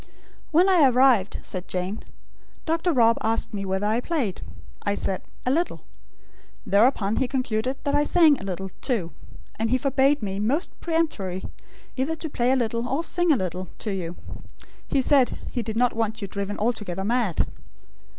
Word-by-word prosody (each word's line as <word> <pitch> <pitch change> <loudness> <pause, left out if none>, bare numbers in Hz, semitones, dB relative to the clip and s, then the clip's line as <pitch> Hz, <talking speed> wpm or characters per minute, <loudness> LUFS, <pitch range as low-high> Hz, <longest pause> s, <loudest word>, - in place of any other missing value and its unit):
"When 345 +4 +4
I 340 -8 +6
arrived," 250 -6 +4
said 185 -1 -5
Jane, 185 +3 -3 0.6
"Dr. 330 +2 +1
Rob 230 -5 +4
asked 225 0 -1
me 200 -1 -3
whether 190 +1 -1
I 220 +3 +2
played. 255 - -2 0.4
I 200 0 -1
said: 190 -2 -2 0.2
'A 250 - +2
little.' 335 +5 -1 0.8
Thereupon 210 0 +3
he 265 - +1
concluded 255 -1 -1
I 285 0 +2
sang 310 -2 +4
a - - -9
little, 190 0 -4
too; 205 - -1 0.5
and 225 0 0
he 255 - +3
forbade 275 0 +2
me, 195 -1 -3
most 270 - 0
peremptorily, 260 - -1 0.5
either 275 +5 0
to 320 0 -5
play 245 -1 +1
a - - +4
little; 235 -1 -1
or 280 +5 0
sing 350 0 +2
a 285 - +4
little, 185 -2 -4
to 215 - -3
you. 175 -2 -4 0.7
He 270 - +2
said 265 -1 +3
he 245 - -2
did 220 0 -4
not 245 0 +3
want 225 0 -1
you 200 - -4
driven 200 +1 -4
altogether 210 -5 -2
mad." 230 -6 +1
235 Hz, 170 wpm, -25 LUFS, 200-275 Hz, 0.8 s, I